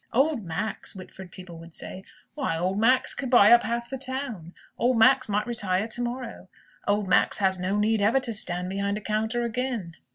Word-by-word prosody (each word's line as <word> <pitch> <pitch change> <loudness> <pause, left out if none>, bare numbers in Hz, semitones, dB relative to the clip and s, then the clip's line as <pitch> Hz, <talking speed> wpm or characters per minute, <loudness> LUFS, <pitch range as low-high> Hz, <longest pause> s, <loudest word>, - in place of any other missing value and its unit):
"Old 270 -1 +2
Max!" 185 +6 -3
Whitford 190 -1 -11
people 175 -2 -11
would 165 0 -9
say. 190 - -6 0.3
"Why, 265 - -2
old 185 +4 -1
Max 250 +4 +3
could 265 - -5
buy 230 -4 +6
up 240 0 +8
half 235 +1 -3
the 265 +1 -6
town. 255 - -6 0.2
Old 245 +1 +1
Max 255 +2 +5
might 210 +1 0
retire 200 -5 -1
to 240 +2 -2
morrow. 240 -5 -5 0.4
Old 205 -1 +1
Max 185 - +3
has 190 -2 +1
no 190 +3 -1
need 215 +1 +1
ever 225 +6 +3
to 240 -4 -2
stand 180 -3 -1
behind 200 +2 -2
a - - -7
counter 220 +3 -1
again." 235 -7 -3
215 Hz, 195 wpm, -26 LUFS, 190-240 Hz, 0.4 s, up